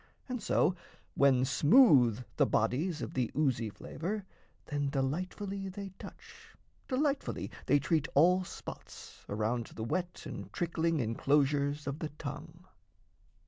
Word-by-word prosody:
And 250 Hz, -3 st, -4 dB
so, 180 Hz, -, +2 dB, 0.4 s
when 130 Hz, -2 st, +4 dB
smooth 140 Hz, -, +5 dB
The -, -, +4 dB
bodies 150 Hz, -, 0 dB
of -, -, -5 dB
the 125 Hz, -3 st, 0 dB
oozy 125 Hz, -7 st, +1 dB
flavour, 185 Hz, -, -5 dB, 0.4 s
then 145 Hz, -2 st, -1 dB
Delightfully 185 Hz, +8 st, -2 dB
they 200 Hz, +1 st, -6 dB
touch, -, -, -13 dB, 0.3 s
delightfully 280 Hz, +1 st, -1 dB, 0.2 s
They 145 Hz, -, +5 dB
treat 150 Hz, +1 st, +1 dB
all 180 Hz, +6 st, +5 dB
spots, -, -, -10 dB
around 110 Hz, +3 st, -1 dB
the 110 Hz, -, -7 dB
wet 175 Hz, +9 st, -3 dB
and -, -, -7 dB
trickling 165 Hz, -2 st, 0 dB
Enclosures 140 Hz, +5 st, +1 dB
of 140 Hz, +2 st, -4 dB
the 155 Hz, -, -3 dB
tongue. 155 Hz, +5 st, -8 dB
150 Hz, 125 wpm, -32 LUFS, 130-180 Hz, 0.4 s, smooth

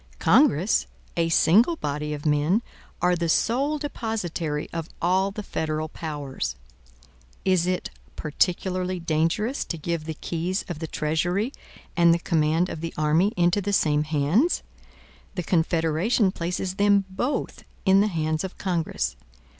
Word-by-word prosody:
Congress, 170 Hz, -, +4 dB, 0.3 s
a 165 Hz, -1 st, +1 dB
single 215 Hz, -, +5 dB
body 150 Hz, -, -3 dB
of 150 Hz, 0 st, -5 dB
men, 155 Hz, +9 st, +2 dB, 0.4 s
are 180 Hz, 0 st, +4 dB
the 170 Hz, -1 st, -1 dB
sole 275 Hz, -, +2 dB
depositary 195 Hz, -, -3 dB
of 165 Hz, -1 st, -4 dB
all 185 Hz, +3 st, +2 dB
the 210 Hz, +2 st, -6 dB
federal 155 Hz, -3 st, -2 dB
powers. 145 Hz, -, -4 dB, 0.9 s
Is 185 Hz, -2 st, +3 dB
it 185 Hz, 0 st, -1 dB, 0.2 s
particularly 180 Hz, +3 st, -1 dB
dangerous 165 Hz, -, 0 dB
to 165 Hz, -, -4 dB
give 165 Hz, 0 st, -3 dB
the 160 Hz, -1 st, -4 dB
keys 175 Hz, +5 st, -2 dB
of 175 Hz, -4 st, -5 dB
the 160 Hz, -, -4 dB
treasury, 175 Hz, -, -1 dB, 0.4 s
and 170 Hz, -1 st, +5 dB
the 170 Hz, -, +4 dB
command 165 Hz, 0 st, +1 dB
of 160 Hz, -, -6 dB
the 165 Hz, 0 st, -5 dB
army, 155 Hz, +6 st, +3 dB
into 175 Hz, +3 st, +3 dB
the 200 Hz, +1 st, -2 dB
same 150 Hz, -5 st, +3 dB
hands? 155 Hz, -, +1 dB, 0.7 s
The 180 Hz, -, -2 dB
Confederation 170 Hz, +5 st, +2 dB
places 180 Hz, +2 st, -3 dB
them 200 Hz, -1 st, +4 dB
both 245 Hz, +9 st, -3 dB, 0.2 s
in 195 Hz, 0 st, +6 dB
the 210 Hz, -, +3 dB
hands 155 Hz, -3 st, -1 dB
of 190 Hz, -, -6 dB
Congress. 175 Hz, -, -1 dB
170 Hz, 140 wpm, -25 LUFS, 155-195 Hz, 0.9 s, in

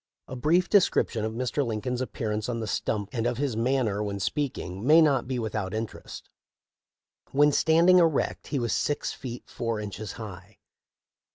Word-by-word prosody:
A 130 Hz, -, -7 dB
brief 170 Hz, +8 st, +2 dB
description 180 Hz, -, +2 dB
of 110 Hz, 0 st, -2 dB
Mr. 125 Hz, +4 st, -1 dB
Lincoln's 120 Hz, +2 st, -2 dB
appearance 110 Hz, -3 st, -3 dB
on 115 Hz, -1 st, -2 dB
the 110 Hz, -, -3 dB
stump 105 Hz, -1 st, -2 dB
and 120 Hz, -2 st, -1 dB
of 120 Hz, -1 st, -1 dB
his 135 Hz, -4 st, -1 dB
manner 115 Hz, -3 st, 0 dB
when 100 Hz, -1 st, -3 dB
speaking 100 Hz, -, -3 dB
may 155 Hz, +6 st, +7 dB
not 140 Hz, -6 st, +3 dB
be 130 Hz, -1 st, -2 dB
without 110 Hz, -3 st, -3 dB
interest. 110 Hz, 0 st, -6 dB, 1.0 s
When 145 Hz, +2 st, +4 dB
standing 170 Hz, +5 st, +5 dB
erect 165 Hz, -4 st, +1 dB
he 145 Hz, -, -2 dB
was 120 Hz, -3 st, -1 dB
six 145 Hz, -, -1 dB
feet 125 Hz, -2 st, -7 dB
four 115 Hz, -2 st, -3 dB
inches 105 Hz, -1 st, -6 dB
high. 100 Hz, -3 st, -10 dB
120 Hz, 165 wpm, -27 LUFS, 110-140 Hz, 1.0 s, may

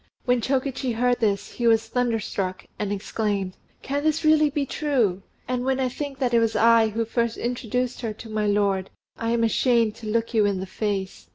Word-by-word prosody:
When 245 Hz, -1 st, +2 dB
Chokichi 265 Hz, 0 st, -1 dB
heard 245 Hz, +2 st, +1 dB
this, 205 Hz, -3 st, 0 dB
he 240 Hz, -, -1 dB
was 225 Hz, -1 st, +3 dB
thunderstruck, 220 Hz, -6 st, -2 dB
and 205 Hz, -1 st, -2 dB
exclaimed, 200 Hz, -2 st, -2 dB, 0.3 s
"Can 285 Hz, +2 st, -2 dB
this 310 Hz, +1 st, +1 dB
really 310 Hz, -1 st, +5 dB
be 285 Hz, -1 st, -1 dB
true! 245 Hz, -, 0 dB, 0.3 s
And 250 Hz, -1 st, -1 dB
when 265 Hz, 0 st, 0 dB
I 260 Hz, -1 st, +1 dB
think 280 Hz, +2 st, -5 dB
that 255 Hz, -3 st, 0 dB
it 235 Hz, -, +6 dB
was 225 Hz, -1 st, +1 dB
I 230 Hz, 0 st, +5 dB
who 225 Hz, +2 st, -1 dB
first 235 Hz, 0 st, -1 dB
introduced 245 Hz, +1 st, -2 dB
her 225 Hz, -3 st, -2 dB
to 220 Hz, +2 st, -10 dB
my 215 Hz, -1 st, -1 dB
lord, 200 Hz, -2 st, +1 dB, 0.3 s
I 230 Hz, -, -1 dB
am 230 Hz, 0 st, +2 dB
ashamed 230 Hz, -1 st, +2 dB
to 220 Hz, -, -8 dB
look 230 Hz, +2 st, 0 dB
you 220 Hz, -2 st, +4 dB
in 200 Hz, -2 st, +1 dB
the 190 Hz, -, -4 dB
face." 195 Hz, -1 st, -3 dB
230 Hz, 200 wpm, -24 LUFS, 210-250 Hz, 0.3 s, it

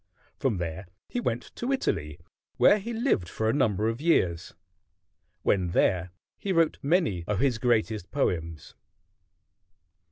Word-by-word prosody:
From 125 Hz, -7 st, 0 dB
there 85 Hz, +2 st, -4 dB, 0.2 s
he 245 Hz, -, -2 dB
went 120 Hz, -, -1 dB
to 245 Hz, +3 st, -2 dB
Italy, 75 Hz, -, -1 dB, 0.4 s
where 210 Hz, -, +6 dB
he 225 Hz, +4 st, -6 dB
lived 225 Hz, -, 0 dB
for 110 Hz, -, -2 dB
a 110 Hz, -, +2 dB
number 110 Hz, -6 st, +1 dB
of 115 Hz, +4 st, -2 dB
years. 90 Hz, -, +1 dB, 0.9 s
When 90 Hz, -4 st, +1 dB
there 90 Hz, -2 st, +2 dB, 0.3 s
he 200 Hz, -, -2 dB
wrote 165 Hz, -3 st, +2 dB
many 145 Hz, -, +1 dB
of 105 Hz, -2 st, 0 dB
his 125 Hz, -4 st, +1 dB
greatest 110 Hz, -5 st, 0 dB
poems. 85 Hz, -, -2 dB
110 Hz, 135 wpm, -27 LUFS, -, 0.9 s, where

